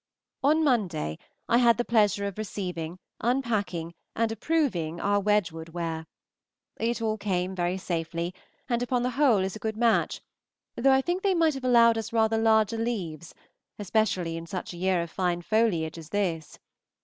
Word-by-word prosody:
On 305 +4 +3
Monday 185 - 0 0.3
I 235 - +4
had 235 -2 +5
the 240 - -1
pleasure 205 -3 +2
of 200 +1 -5
receiving, 180 -5 -4 0.2
unpacking, 205 -9 -1 0.2
and 230 -1 +1
approving 225 - -1
our 205 +2 +2
Wedgwood 180 -6 0
ware. 165 -1 -4 0.7
It 230 +1 -1
all 220 -1 -1
came 190 -2 -1
very 180 0 -1
safely, 170 -1 -3 0.3
and 240 -2 0
upon 245 0 0
the 250 - 0
whole 250 -7 +3
is 190 +2 -3
a - - -7
good 220 0 -3
match, 230 -1 +2 0.6
though 270 +3 +3
I 265 0 +5
think 355 +4 -1
they 390 -2 +2
might 325 -2 +3
have 270 -1 -7
allowed 235 -2 +5
us 225 0 -5
rather 225 -1 +2
larger 220 -1 +3
leaves, 175 -9 -4 0.4
especially 190 -5 0
in 165 0 -7
such 180 +1 -5
a - - -9
year 185 -1 +1
of 170 - -9
fine 175 -2 -1
foliage 170 -7 +1
as 160 -1 -11
this. 170 -5 -2
205 Hz, 170 wpm, -27 LUFS, 175-235 Hz, 0.7 s, had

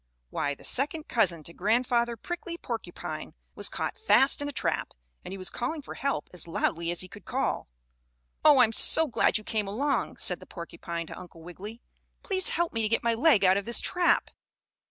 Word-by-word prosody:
Why, 145 0 -1
the - - -18
second 300 +4 0
cousin 175 -9 +3
to 170 - -8
Grandfather 235 +4 +1
Prickly 345 +5 -5
Porcupine - - -6 0.2
was - - 0
caught - - -3
fast 280 -11 +4
in 290 - -2
a - - -4
trap, - - -2 0.3
and - - -8
he 195 - -5
was 185 -1 -4
calling 290 +5 -3
for - - -8
help 280 0 -2
as 180 - -4
loudly 170 0 -1
as 175 - 0
he 185 - -4
could 200 +1 -13
call. - - -2 0.8
"Oh, 290 -4 +7
I'm 225 -3 +4
so 320 +7 +6
glad 255 - +2
you 215 - -6
came 215 -2 -1
along," 260 +6 -1
said 180 - 0
the - - -14
porcupine 170 0 -6
to - - -9
Uncle 170 -2 -13
Wiggily. 205 +7 -9 0.4
"Please 375 -1 0
help 345 0 -1
me 225 - -1
to 215 - 0
get 230 - +1
my 235 0 +2
leg 230 -4 +4
out 185 +1 +5
of 200 - -3
this 235 - +3
trap." 355 -1 +2
225 Hz, 200 wpm, -28 LUFS, 185-280 Hz, 0.8 s, Oh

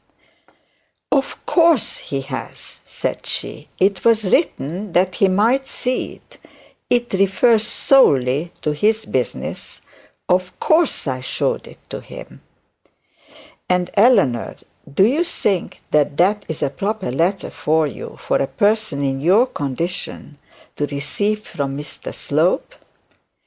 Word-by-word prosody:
'Of 275 -1 -1
course 335 - +3
he 135 -1 -4
has,' 135 - -8
said - - -4
she; - - -4
'it 190 -1 +2
was 225 -2 +4
written 190 - 0
that 185 +1 +2
he 195 - +3
might 230 +8 +2
see 255 -1 -2
it. - - -19 0.5
It 240 -2 +1
refers 210 +3 +3
solely 145 - +3
to 150 - +1
his 215 +8 +1
business 125 -3 -4 0.5
of 185 0 0
course 320 -1 +2
I 130 -3 -2
showed 130 - -2
it - - -13
to - - -5
him.' - - -11 1.3
'And 180 0 +1
Eleanor, 200 - +3 0.4
do 190 +7 +4
you 285 +10 +2
think 200 - -1
that 145 -1 +2
that 205 +4 +2
is 160 - -3
a 135 - 0
proper 195 - -3
letter 175 +8 0
for 160 +1 +1
you 145 - -7
for - - +1
a 135 - 0
person 205 -8 +1
in 135 -1 -1
your 195 - +5
condition 145 - -5 0.4
to 145 - 0
receive 175 +10 -1
from 140 -1 -4
Mr 145 0 -7
Slope?' - - 0
185 Hz, 130 wpm, -20 LUFS, 145-220 Hz, 1.3 s, your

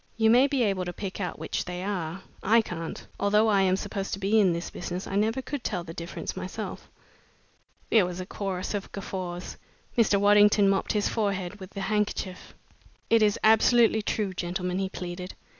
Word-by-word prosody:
You 220 -1 +4
may 250 +4 +6
be 270 -3 +1
able 195 -4 0
to 175 - -4
pick 195 +1 -5
out 180 - -3
which - - -3
they 180 0 -5
are. 185 -2 -3 0.2
I 225 +3 +5
can't. 165 -5 -6
Although 210 +2 +3
I 200 -2 +4
am 185 -1 +3
supposed 195 0 -4
to 195 - -3
be 200 +3 +3
in 195 -4 +4
the 170 0 -3
business, 180 +1 -5
I 195 - -5
never 225 +6 +1
could 275 0 -5
tell 180 -5 -2
the 165 -1 -8
difference 170 +1 -5
myself." - - -6 1.0
There 210 -6 +5
was 180 0 -6
a 185 - -4
chorus 190 -1 -4
of 200 -1 -4
guffaws. 185 -2 -5 0.4
Mr. 215 -4 +4
Waddington 205 0 +5
mopped 195 -1 +1
his 210 -1 +1
forehead 200 -3 -2
with 190 +1 -11
a - - -2
handkerchief. 205 -3 -2 0.6
"It 230 -1 +6
is 210 -1 +3
absolutely 220 0 +5
true, 205 -2 -1
gentlemen," 180 0 -2
he 190 -1 -1
pleaded. 180 0 -6
195 Hz, 190 wpm, -27 LUFS, 180-210 Hz, 1.0 s, may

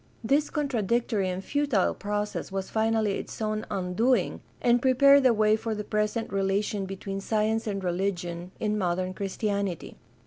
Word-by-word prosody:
— - - -32
This 295 +1 +2
contradictory 235 -7 0
and 185 +1 -4
futile 285 -9 +1
process 205 -1 -3
was 195 0 -4
finally 220 -2 +1
its - - -8
own 215 -1 -2
un 180 -2 -3
doing 230 -1 +1 0.2
and 240 0 +3
prepared 275 +2 +6
the 260 -2 +5
way 215 -1 +3
for 220 0 -3
the 210 - -4
present 210 +1 -1
relation 195 +1 0
between 195 +1 -5
science 220 +2 0
and 195 -2 -2
religion 175 -1 -2
in 210 -1 0
modern 185 0 -1
Christianity. 200 -2 -3
210 Hz, 160 wpm, -27 LUFS, 195-225 Hz, 0.2 s, prepared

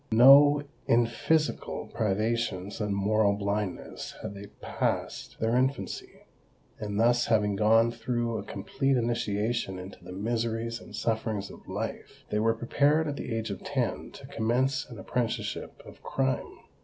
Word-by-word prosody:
No—in 140 0 +6
physical 155 +7 0
privations 110 -2 -1
and 105 -1 0
moral 100 +1 +3
blindness 100 -1 -3
had - - -4
they 100 0 -9
passed - - -2
their 115 +1 +1
infancy:—and 125 -5 -4
thus, 120 +1 +4
having 105 -3 +2
gone 115 +3 +4
through 120 -2 -2
a - - -5
complete 135 +8 -1
initiation 115 -3 -1
into 90 0 -10
the 90 - -9
miseries 115 +3 -2
and - - -11
sufferings 110 -3 -1
of - - -14
life, - - -5
they 105 - +1
were 115 +1 +2
prepared 145 +7 +2
at 145 - -2
the 130 - -5
age 110 -2 -3
of 95 - -6
ten - - -2
to - - -11
commence 130 +5 0
an 120 - -9
apprenticeship 115 +5 -3
of - - -13
crime. 135 -1 -2
115 Hz, 140 wpm, -28 LUFS, 105-120 Hz, -, No—in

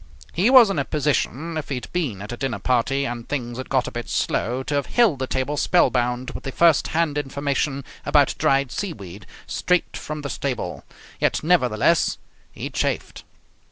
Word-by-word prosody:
He 190 +8 +3
was 250 -6 +8
in 165 - -1
a - - +1
position, 150 +2 -1
if 155 - -5
he 140 - -1
had 125 - -7
been 130 - -2
at 105 - -7
a 120 - -5
dinner 135 -2 -2
party 130 +3 +1
and 120 -2 -5
things 125 -4 -3
had 130 - -6
got 130 -2 +1
a - - -5
bit 120 -1 -6
slow, 125 +3 -1
to 145 - -4
have 140 -1 0
held 220 - +3
the 130 - -2
table 130 +3 -1
spellbound 125 -6 +2
with - - -8
the 135 - -4
first 165 +1 +4
hand 155 -3 0
information 140 0 -2 0.2
about - - +3
dried 135 -2 +2
seaweed, 105 - -6 0.2
straight 180 -1 0
from 155 -1 -6
the 140 - -4
stable; 125 -10 -3 0.4
yet - - +1
nevertheless 155 -2 +3 0.3
he - - -6
chafed. - - -2
140 Hz, 185 wpm, -23 LUFS, 125-155 Hz, 0.4 s, was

